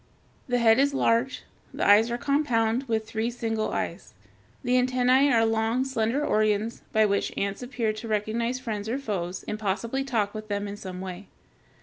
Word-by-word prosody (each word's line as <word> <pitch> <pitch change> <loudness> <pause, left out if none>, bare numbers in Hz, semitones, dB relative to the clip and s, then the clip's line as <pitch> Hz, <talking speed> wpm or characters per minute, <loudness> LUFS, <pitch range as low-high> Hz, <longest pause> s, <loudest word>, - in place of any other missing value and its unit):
The 245 -1 +1
head 230 0 +5
is 280 0 +2
large. 235 +1 +1 0.3
The - - -2
eyes 210 +3 +6
are 240 - -1
compound, 250 -3 +1
with 220 -2 -1
three 220 +1 -1
single 225 -2 -2
eyes. - - -4 0.5
The 245 - 0
antennæ 255 +2 +3
are 225 -2 +4
long, 225 +3 +1
slender 260 +2 0
organs 215 +1 +1
by 220 -1 +4
which 200 -1 0
ants 200 +2 -2
appear 245 -3 -2
to 215 +2 -7
recognize 225 +3 -1
friends 220 -4 -4
or 245 - 0
foes, 190 -9 -4
and 215 - -3
possibly 225 +6 -1
talk 220 -7 -1
with 215 -1 -7
them 205 0 -2
in 200 - -5
some 185 -3 -7
way. 190 +1 -7
225 Hz, 180 wpm, -26 LUFS, 215-250 Hz, 0.5 s, eyes